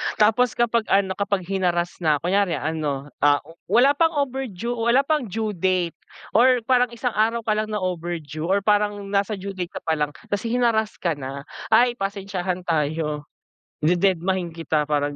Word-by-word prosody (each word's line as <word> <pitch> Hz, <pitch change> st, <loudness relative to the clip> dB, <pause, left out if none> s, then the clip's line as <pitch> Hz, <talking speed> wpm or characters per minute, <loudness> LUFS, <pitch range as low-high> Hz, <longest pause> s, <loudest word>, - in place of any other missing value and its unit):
tapos, 225 Hz, +4 st, +3 dB
kapag 235 Hz, -1 st, +1 dB
ano, 195 Hz, -1 st, +2 dB
kapag 200 Hz, -2 st, 0 dB
hinarass 175 Hz, -2 st, -1 dB
nako, 160 Hz, +1 st, +1 dB
kunyari 200 Hz, -3 st, +2 dB
ano, 145 Hz, -2 st, -3 dB
ah, 145 Hz, 0 st, +3 dB
oh, 165 Hz, +3 st, -17 dB
wala 240 Hz, +8 st, +5 dB
pang 325 Hz, +2 st, +2 dB
overdue, 260 Hz, -6 st, -2 dB
wala 240 Hz, +3 st, +2 dB
pang 300 Hz, -4 st, 0 dB
due 215 Hz, +2 st, -2 dB
date 180 Hz, -2 st, 0 dB, 0.3 s
or 250 Hz, +1 st, +4 dB
parang 250 Hz, +1 st, +3 dB
isang 250 Hz, +1 st, -1 dB
araw 225 Hz, +2 st, +1 dB
ka 215 Hz, -, 0 dB
lang 215 Hz, 0 st, 0 dB
na 210 Hz, -3 st, -3 dB
overdue, 165 Hz, -3 st, -4 dB
or 195 Hz, +2 st, +1 dB
parang 205 Hz, -1 st, +1 dB
nasa 200 Hz, +1 st, +1 dB
due 200 Hz, 0 st, -6 dB
date 185 Hz, -2 st, -6 dB
ka -, -, -6 dB
pa 160 Hz, -1 st, 0 dB
lang, 150 Hz, 0 st, -1 dB, 0.2 s
tas 205 Hz, +3 st, -1 dB
hinarass 230 Hz, -2 st, +1 dB
ka 170 Hz, -, -1 dB
na. 140 Hz, -2 st, -5 dB, 0.2 s
Ay, 240 Hz, +3 st, +5 dB
pasensyahan 195 Hz, -2 st, -3 dB
tayo, 150 Hz, -2 st, -1 dB, 0.5 s
dededmahin 180 Hz, +1 st, +1 dB
kita 160 Hz, -2 st, -1 dB
parang 145 Hz, -1 st, -1 dB
195 Hz, 170 wpm, -23 LUFS, 165-225 Hz, 0.5 s, wala